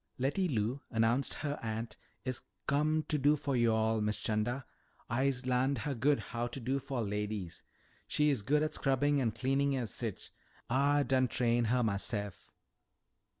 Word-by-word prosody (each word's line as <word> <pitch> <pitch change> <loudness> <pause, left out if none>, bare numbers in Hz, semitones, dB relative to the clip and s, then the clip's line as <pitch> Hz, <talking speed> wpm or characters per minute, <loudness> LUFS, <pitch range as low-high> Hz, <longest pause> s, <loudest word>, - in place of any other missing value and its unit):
"Letty 145 +9 +1
Lou," 120 -1 -1
announced 115 +3 +1
her 145 -1 -3
aunt, 110 0 -4 0.3
"is 130 -1 -1 0.2
com' 155 +2 +2
to 150 - +1
do 145 +2 +4
fo' 145 -1 -2
yo'all, 110 -2 +2
Miss 105 0 0
'Chanda. 120 +5 -1 0.5
I'se 130 +1 +1
larn'd 130 +2 +2
her 140 +5 -2
good 140 +4 +2
how 120 0 -3
to 120 +3 -5
do 130 +3 -1
fo' 135 -3 -3
ladies. 105 -3 -3 0.5
She 150 0 +3
is 135 - 0
good 150 +8 +2
at 155 0 -1
scrubbin' 140 +1 +2
an' 120 - +2
cleanin' 135 +5 +1
an 125 -2 -1
sich. 105 - -3 0.4
Ah 145 +3 +3
done 130 -1 +2
train'd 120 -1 +1
her 125 +2 +2
mahse'f." 100 -1 -2
130 Hz, 160 wpm, -33 LUFS, 115-140 Hz, 0.5 s, do